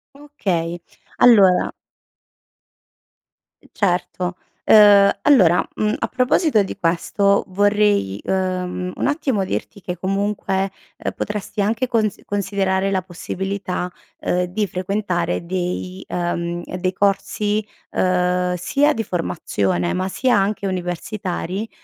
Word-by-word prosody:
Okay, 185 Hz, -, -3 dB, 0.4 s
allora 200 Hz, -7 st, +6 dB, 2.0 s
Certo, 180 Hz, -1 st, -1 dB, 0.3 s
uhm, 205 Hz, -2 st, +7 dB
allora, 190 Hz, -, +5 dB
mhmm, 215 Hz, 0 st, 0 dB
a -, -, -1 dB
proposito 255 Hz, -, +2 dB
di 195 Hz, -, -6 dB
questo 200 Hz, +3 st, +2 dB
vorrei, 205 Hz, -, +2 dB
ehm, 185 Hz, -1 st, -2 dB
un -, -, -1 dB
attimo 270 Hz, -9 st, 0 dB
dirti, 200 Hz, +1 st, -4 dB
che 180 Hz, 0 st, -5 dB
comunque 195 Hz, 0 st, -1 dB, 0.4 s
potresti 210 Hz, 0 st, -3 dB
anche 225 Hz, +5 st, 0 dB
cons 220 Hz, -4 st, 0 dB
considerare 195 Hz, -1 st, 0 dB
la 190 Hz, -2 st, 0 dB
possibilità, 185 Hz, +1 st, -4 dB, 0.3 s
uhm, 180 Hz, 0 st, 0 dB
di 200 Hz, +4 st, -1 dB
frequentare 185 Hz, -2 st, -2 dB
dei, 185 Hz, +1 st, -3 dB
ehm, 175 Hz, 0 st, -2 dB
dei 185 Hz, +1 st, -1 dB
corsi, 205 Hz, +2 st, 0 dB, 0.3 s
uhm, 180 Hz, 0 st, +1 dB
sia 285 Hz, -, +2 dB
di 225 Hz, -, -2 dB
formazione, 100 Hz, -, -1 dB
ma 185 Hz, +1 st, -1 dB
sia 250 Hz, +6 st, +1 dB
anche 200 Hz, +1 st, 0 dB
universitari, 185 Hz, +2 st, -3 dB
190 Hz, 105 wpm, -21 LUFS, 180-210 Hz, 2.0 s, uhm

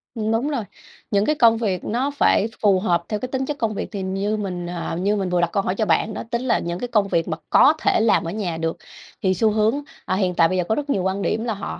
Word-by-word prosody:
Ừm, 220 Hz, -1 st, -1 dB
đúng 230 Hz, +6 st, +1 dB
rồi. 270 Hz, -7 st, -2 dB, 0.5 s
Những 200 Hz, 0 st, +2 dB
cái 305 Hz, -, +2 dB
công 230 Hz, -4 st, +5 dB
việc 200 Hz, -6 st, -1 dB
nó 260 Hz, +6 st, -1 dB
phải 230 Hz, -6 st, +3 dB
phù 200 Hz, -3 st, +4 dB
hợp 175 Hz, -3 st, +1 dB
theo 210 Hz, -, -1 dB
cái 255 Hz, -, -4 dB
tính 265 Hz, 0 st, -2 dB
chất 295 Hz, +1 st, -4 dB
công 225 Hz, -4 st, -1 dB
việc. -, -, -4 dB
Thì 200 Hz, -, -4 dB
như 195 Hz, +3 st, -1 dB
mình, 180 Hz, -4 st, -4 dB
à, 175 Hz, -1 st, -4 dB
như 205 Hz, +2 st, +1 dB
mình 195 Hz, -3 st, -1 dB
vừa 180 Hz, 0 st, +1 dB
đặt 170 Hz, -, +1 dB
câu 200 Hz, -, 0 dB
hỏi 185 Hz, -, -1 dB
cho 215 Hz, -, 0 dB
bạn 205 Hz, +5 st, +1 dB
đó, -, -, -5 dB
tính 235 Hz, -1 st, 0 dB
là 255 Hz, -2 st, +1 dB
những 170 Hz, +1 st, -4 dB
cái 245 Hz, -, -3 dB
công 210 Hz, -4 st, +2 dB
việc 165 Hz, -4 st, 0 dB
mà 160 Hz, -2 st, -2 dB
có 305 Hz, -, +6 dB
thể -, -, +2 dB
làm 220 Hz, -3 st, +3 dB
ở 165 Hz, -, -4 dB
nhà 185 Hz, -5 st, -3 dB
được 165 Hz, 0 st, -2 dB, 0.5 s
thì 185 Hz, -, +3 dB
xu 215 Hz, +4 st, +2 dB
hướng, 220 Hz, +6 st, +1 dB, 0.2 s
à, -, -, 0 dB
hiện 185 Hz, -2 st, 0 dB
tại 165 Hz, -1 st, +5 dB
bây 185 Hz, -, -1 dB
giờ 180 Hz, -, +1 dB
có 220 Hz, +6 st, 0 dB
rất 295 Hz, 0 st, -4 dB
nhiều 195 Hz, -9 st, +1 dB
quan 190 Hz, +1 st, -1 dB
điểm 220 Hz, +2 st, -1 dB
là 235 Hz, -2 st, -1 dB
họ 200 Hz, -1 st, -6 dB
205 Hz, 295 wpm, -22 LUFS, 185-225 Hz, 0.5 s, có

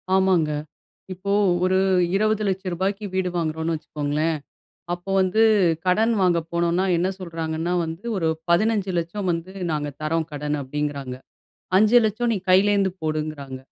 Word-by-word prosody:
ஆமாங்க. 185 Hz, -5 st, +3 dB, 0.6 s
இப்போ 200 Hz, +2 st, -4 dB, 0.3 s
ஒரு 185 Hz, +1 st, +3 dB, 0.4 s
2000000ரூபாய்க்கு 195 Hz, -1 st, 0 dB
வீடு 185 Hz, -1 st, 0 dB
வாங்குறோன்ன்னு 160 Hz, 0 st, -1 dB
வச்சுக்கோங்ளேன், 150 Hz, +1 st, -2 dB, 0.6 s
அப்போ 175 Hz, +2 st, -9 dB
வந்து 190 Hz, +4 st, +2 dB, 0.4 s
கடன் 220 Hz, +5 st, +3 dB
வாங்க 175 Hz, -2 st, +3 dB
போனோன்னா 170 Hz, +2 st, +1 dB
என்ன 180 Hz, +3 st, +1 dB
சொல்றாங்கன்னா 165 Hz, -1 st, -3 dB
வந்து, 165 Hz, +6 st, -7 dB
ஒரு 165 Hz, -3 st, 0 dB, 0.2 s
1500000 190 Hz, -2 st, 0 dB
வந்து 170 Hz, +3 st, -5 dB, 0.2 s
நாங்க 150 Hz, -1 st, -2 dB
தர்றோம் 160 Hz, +1 st, -1 dB
கடன் 150 Hz, +1 st, -2 dB
அப்டிங்றாங்க. 140 Hz, -2 st, -4 dB, 0.6 s
500000 220 Hz, +2 st, +4 dB
நீ 205 Hz, -, 0 dB
கையிலேருந்து 195 Hz, +1 st, +4 dB
போடுங்கறாங்க. 155 Hz, -4 st, -3 dB
175 Hz, 115 wpm, -23 LUFS, 155-195 Hz, 0.6 s, 500000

